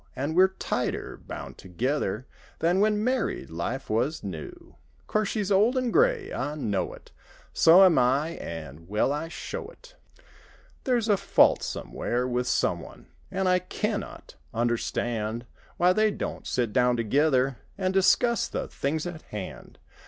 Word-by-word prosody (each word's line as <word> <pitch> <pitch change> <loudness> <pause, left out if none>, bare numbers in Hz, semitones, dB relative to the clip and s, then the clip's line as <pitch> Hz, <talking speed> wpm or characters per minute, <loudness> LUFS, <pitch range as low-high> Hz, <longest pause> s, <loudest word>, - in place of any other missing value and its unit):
An' 140 +4 -2
we're 185 +3 +6
tighter 125 -10 -3
bound - - -7
together 115 - -2 0.3
Than 175 +3 +2
when 210 0 +2
married 250 - -1
life 115 +12 -3
was 125 +9 -1
new. 85 -6 -8 0.3
'Course 215 -1 0
she's 205 -3 -2
old 215 +7 +4
an' 255 -2 0
gray—I 430 - +1
know 105 -10 -2
it. - - -15 0.4
So 175 +4 +7
am 185 -4 +6
I, 135 +6 +2
an' 80 - -8
well 105 +7 +1
I 150 +3 -3
show 165 - -6
it. - - -16 0.9
There's 240 -4 +1
a 205 -2 +4
fault - - +4
somewhere 125 +1 -2
with 125 0 -1
someone! 65 - -2 0.2
An' 190 0 -1
I 180 0 +4
can 210 +3 -2
not - - -11 0.2
understand 120 -1 -1 0.3
Why 180 +1 +4
they 215 +2 +3
don't 205 - -5
sit 120 -4 -1
down 125 -1 +3
together 130 +2 +2 0.2
An' 185 -1 0
discuss 195 +5 +3
the - - -4
things 155 +3 -2
at 175 -2 -6
hand. 105 -3 -7
150 Hz, 145 wpm, -27 LUFS, 120-195 Hz, 0.9 s, So